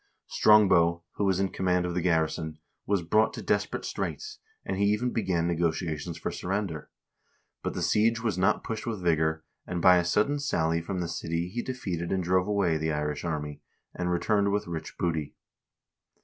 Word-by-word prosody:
Strongbow, 85 -6 +4
who 100 - +1
was 95 -1 +2
in 95 0 +1
command 90 -1 0
of 90 - -2
the 90 - 0
garrison, 80 -2 0 0.3
was 100 -3 +1
brought 110 +6 +2
to - - -6
desperate - - -1
straits, 425 0 -4 0.3
and - - -2
he 100 - +2
even 105 +5 +1
began 90 -7 0
negotiations 85 -1 -1
for - - -3
surrender; 90 -4 -3 0.7
but - - -3
the 90 - -2
siege 110 +6 +3
was 110 -5 -1
not 95 +1 +2
pushed 110 0 -5
with 110 -6 -3
vigor, 80 -1 +1 0.2
and 90 - -2
by 90 +1 +7
a 90 - +2
sudden 105 +11 +1
sally 85 - 0
from 90 +2 -3
the 85 - -2
city 85 +1 -3
he 120 +6 -3
defeated 90 -11 -4
and 95 -1 0
drove 90 +2 +2
away 100 -6 +1
the 80 +1 -1
Irish 75 0 -2
army, 75 -3 -4 0.3
and 90 0 -2
returned 100 +3 +1
with 105 +1 0
rich 85 -3 -6
booty. 80 -4 -2
90 Hz, 180 wpm, -28 LUFS, 85-100 Hz, 0.7 s, by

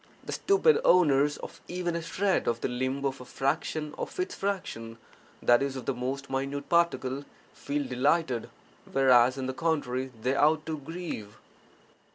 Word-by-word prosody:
The - - -6
stupid 440 +4 +3
owners 145 - +4
of - - -10
even 175 -1 -2
a 170 - -2
shred 190 +4 0
of 115 0 0
the - - 0
limb 130 +3 -2
of 135 -1 -2
a - - -9
fraction 150 +4 -2
of - - -5
its 365 - -1
fraction 115 - -4 0.5
(i.e., 120 +2 +6
of 130 -3 -6
the 135 - 0
most 130 +3 -4
minute 135 +1 -3
particle) 145 -6 +1 0.3
feel 145 0 -3
delighted, 130 -1 +1 0.4
whereas, 130 -1 +5
on 130 - -3
the 130 - -2
contrary, 130 -3 -1
they 125 +4 0
ought 155 +2 +3
to 155 -2 -3
grieve! 150 - -6
140 Hz, 160 wpm, -28 LUFS, 130-165 Hz, 0.5 s, i.e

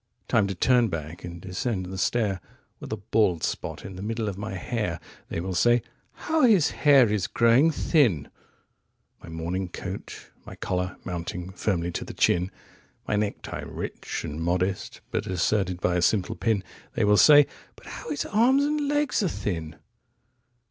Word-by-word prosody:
"39Time 110 -4 +3
to 95 - -3
turn 120 +5 +4
back 85 -3 -6
and 85 -1 -7
descend 95 +1 -2
the 95 +1 -7
stair,40With 100 -4 -3
a 110 - -2
bald 100 -4 +1
spot - - -3
in 95 - -8
the - - -7
middle 110 +1 -2
of 100 - -3
my 105 +1 -5
hair 95 -3 -2 0.3
41(They - - -3
will 95 +1 -3
say: 120 +6 +3 0.3
'How 320 0 -1
his 210 - +5
hair 140 -5 +5
is 100 -4 0
growing 120 +7 +4
thin!")42My 115 - -2
morning 85 +3 -3
coat, - - -7
my - - -10
collar 90 0 -2
mounting 90 0 -5
firmly 90 -2 -1
to - - -4
the - - -9
chin,43My 90 +3 -2
necktie 105 -1 -3
rich - - -5
and 75 +2 -5
modest, 90 +3 -1
but - - -2
asserted 95 0 0
by 90 -1 +1
a - - +1
simple 95 +1 +2
pin 100 +3 0 0.3
44(They - - +2
will 105 0 +5
say: 145 +3 +8 0.3
"But - - -18
how - - -8
his 145 -2 -2
arms 250 +6 +3
and 295 0 0
legs 290 -3 +1
are 195 - +1
thin!") 80 - -3
100 Hz, 160 wpm, -26 LUFS, 90-120 Hz, 0.3 s, say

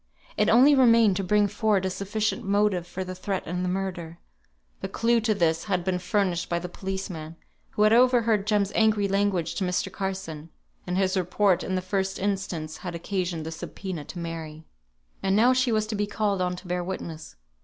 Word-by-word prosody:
It 210 - +2
only 260 +6 +7
remained 230 -6 +5
to 195 - -1
bring 205 +2 +3
forward 205 -2 +1
a 190 - -1
sufficient 200 +3 -2
motive 200 -3 +1
for 185 +2 -5
the 185 0 -6
threat 185 +1 -3
and 180 +2 -3
the 180 - -1
murder. 180 -3 -4 0.6
The - - -5
clue 235 0 +2
to 220 -1 +1
this 165 -3 +1
had 185 -4 0
been 180 0 -1
furnished 180 -1 0
by 170 - 0
the 175 +1 -4
policeman, 180 -4 -6 0.3
who 210 - 0
had 215 +1 +5
overheard 230 -4 +4
Jem's 205 -2 +2
angry 215 -2 +3
language 195 -3 0
to - - -2
Mr. 180 +1 -1
Carson; 190 -5 -5 0.4
and 180 +1 -1
his 190 0 +1
report 185 0 +2
in 185 - -2
the 185 - -2
first 190 0 -1
instance 190 -6 -3
had 180 -2 -6
occasioned 175 -2 -3
the 160 - -5
subpoena 175 0 -6
to - - -9
Mary. 160 -2 -6 0.6
And 195 0 +1
now 240 +4 +5
she 255 -1 +2
was 215 -1 +1
to 215 0 -4
be 205 0 -1
called 205 -2 -1
on 180 0 0
to 180 +1 -11
bear 180 0 -1
witness. 170 - -6
190 Hz, 195 wpm, -26 LUFS, 180-210 Hz, 0.6 s, only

